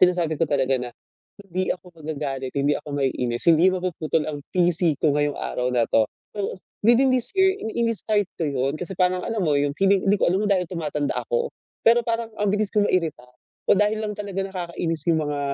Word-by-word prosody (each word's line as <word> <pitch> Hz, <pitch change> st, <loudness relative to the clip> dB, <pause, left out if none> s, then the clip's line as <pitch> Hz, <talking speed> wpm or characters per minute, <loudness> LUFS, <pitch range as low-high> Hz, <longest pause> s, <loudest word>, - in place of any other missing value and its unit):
sinasabi 175 Hz, -4 st, +3 dB
ko 165 Hz, -, +2 dB
talaga 135 Hz, -2 st, +1 dB
na, 125 Hz, -1 st, -5 dB, 0.5 s
"Hindi 185 Hz, -1 st, -2 dB
ako 180 Hz, 0 st, -16 dB
magagalit, 140 Hz, -4 st, -4 dB
hindi 140 Hz, +1 st, +2 dB
ako -, -, -13 dB
maiinis, 125 Hz, -2 st, -1 dB
hindi 165 Hz, +2 st, +5 dB
mapuputol 170 Hz, -4 st, -1 dB
ang 145 Hz, -1 st, -7 dB
pisi 175 Hz, -2 st, +2 dB
ko 155 Hz, -, +3 dB
ngayong 145 Hz, -1 st, +1 dB
araw 125 Hz, 0 st, -2 dB
na 120 Hz, -, +3 dB
'to". 110 Hz, -1 st, +4 dB, 0.3 s
So, 200 Hz, -, -2 dB, 0.3 s
within 255 Hz, +3 st, +5 dB
this 255 Hz, -2 st, +1 dB
year, 380 Hz, 0 st, +5 dB
ini 220 Hz, -, -5 dB
ini-start 215 Hz, -3 st, 0 dB
ko 165 Hz, -, 0 dB
'yon, 135 Hz, 0 st, 0 dB
kasi 185 Hz, +2 st, -5 dB
parang, 180 Hz, 0 st, +2 dB
alam 220 Hz, -4 st, -1 dB
mo, 150 Hz, -3 st, +2 dB
'yong 145 Hz, 0 st, 0 dB
feeling 195 Hz, 0 st, +3 dB
'di 200 Hz, -, +4 dB
ko -, -, +5 dB
alam 185 Hz, -, +2 dB
kung 205 Hz, -, 0 dB
dahil 180 Hz, -2 st, 0 dB
tumatanda 150 Hz, -4 st, -2 dB
ako, 480 Hz, 0 st, 0 dB, 0.3 s
pero 235 Hz, +1 st, +6 dB
parang, 230 Hz, 0 st, -1 dB
ang 210 Hz, -1 st, +1 dB
bilis 210 Hz, -1 st, 0 dB
ko 210 Hz, -, +2 dB
mairita 160 Hz, -10 st, 0 dB, 0.4 s
o -, -, +8 dB
dahil 210 Hz, +1 st, +1 dB
lang 210 Hz, -1 st, -3 dB
talaga 200 Hz, -2 st, -3 dB
nakakainis 170 Hz, -4 st, -3 dB
'yong 160 Hz, -1 st, +3 dB
mga,. 145 Hz, -1 st, -2 dB
175 Hz, 205 wpm, -24 LUFS, 145-205 Hz, 0.5 s, o